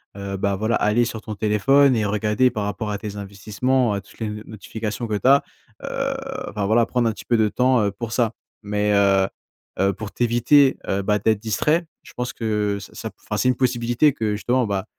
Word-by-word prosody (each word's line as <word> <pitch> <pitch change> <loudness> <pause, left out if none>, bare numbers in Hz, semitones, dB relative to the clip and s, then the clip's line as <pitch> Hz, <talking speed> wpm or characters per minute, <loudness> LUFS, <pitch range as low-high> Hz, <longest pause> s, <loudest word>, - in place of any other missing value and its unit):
heu, 100 -1 -5
bah, 100 0 0
voilà 110 +4 0
aller 105 +3 +2
sur 110 -1 -4
ton 110 -1 -6
téléphone 125 +7 +3
et 105 - 0
regarder 105 +4 +2
par 105 - -3
rapport 105 +1 -3
à 100 - -2
tes 105 0 -7
investissements, 105 +5 -1
heu, 100 - -3
toutes 95 - -20
les 110 - -2
n 105 0 -6
notifications 110 +2 -5
que 110 - -1
tu 105 - 0
as, 140 +1 +6 0.4
heu, 275 0 -2 0.4
enfin 105 -1 -3
voilà 115 +3 +3
prendre 120 -1 +1
un - - 0
petit 105 - -11
peu 120 - +2
de 110 -2 +3
temps, 125 +1 +2
heu, 100 - +1
pour 110 +3 -6
ça. 115 -2 +1 0.3
Mais 105 0 0
heu 100 -1 +4 0.5
heu 95 0 +3
pour 105 +2 -7
t'éviter, 120 +4 +3
heu, 100 - 0
bah, 105 +1 +1
d'être 110 +1 +1
distrait, 150 - +1 0.2
je - - -15
pense 125 0 -3
que 105 -3 -1
ça 100 - -12
ça - - -5
p - - -22
enfin - - -4
c'est 130 - +2
une 125 - +2
possibilité 120 +3 +2
que 110 -3 -2
justement, 120 +5 +1
bah, 100 -2 -2
110 Hz, 225 wpm, -22 LUFS, 100-120 Hz, 0.5 s, as